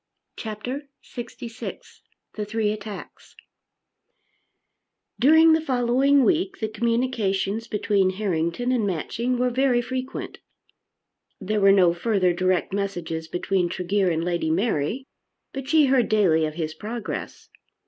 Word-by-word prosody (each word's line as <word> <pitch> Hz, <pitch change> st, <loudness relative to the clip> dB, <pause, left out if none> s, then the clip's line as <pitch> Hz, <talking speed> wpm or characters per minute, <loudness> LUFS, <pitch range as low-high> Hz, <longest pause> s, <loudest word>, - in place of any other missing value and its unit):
CHAPTER 245 Hz, +6 st, -6 dB
LXVI 235 Hz, -1 st, -8 dB, 0.3 s
The 215 Hz, -, -4 dB
Three 210 Hz, 0 st, -1 dB
Attacks 215 Hz, -1 st, -9 dB, 1.8 s
During 320 Hz, +5 st, +6 dB
the 320 Hz, -, +3 dB
following 265 Hz, 0 st, +3 dB
week 365 Hz, +6 st, +1 dB
the 220 Hz, -, -2 dB
communications 230 Hz, -2 st, -1 dB
between 205 Hz, -3 st, +1 dB
Harrington 185 Hz, +3 st, -1 dB
and 235 Hz, -5 st, +1 dB
Matching 235 Hz, +8 st, -2 dB
were 250 Hz, 0 st, +1 dB
very 255 Hz, -1 st, +2 dB
frequent. 255 Hz, +2 st, -5 dB, 1.0 s
There 210 Hz, +1 st, -1 dB
were 195 Hz, 0 st, +7 dB
no 185 Hz, -3 st, +5 dB
further 185 Hz, -1 st, +1 dB
direct 185 Hz, +1 st, 0 dB
messages 175 Hz, -5 st, -3 dB
between 180 Hz, +1 st, 0 dB
Tregear 185 Hz, +2 st, 0 dB
and 165 Hz, -1 st, -1 dB
Lady 170 Hz, -2 st, -1 dB
Mary, 195 Hz, -, 0 dB, 0.5 s
but 270 Hz, -1 st, -6 dB
she 310 Hz, -1 st, +5 dB
heard 260 Hz, -3 st, +2 dB
daily 180 Hz, -7 st, +3 dB
of 155 Hz, 0 st, -5 dB
his 160 Hz, -2 st, -3 dB
progress. 215 Hz, +7 st, -6 dB
215 Hz, 120 wpm, -24 LUFS, 185-250 Hz, 1.8 s, were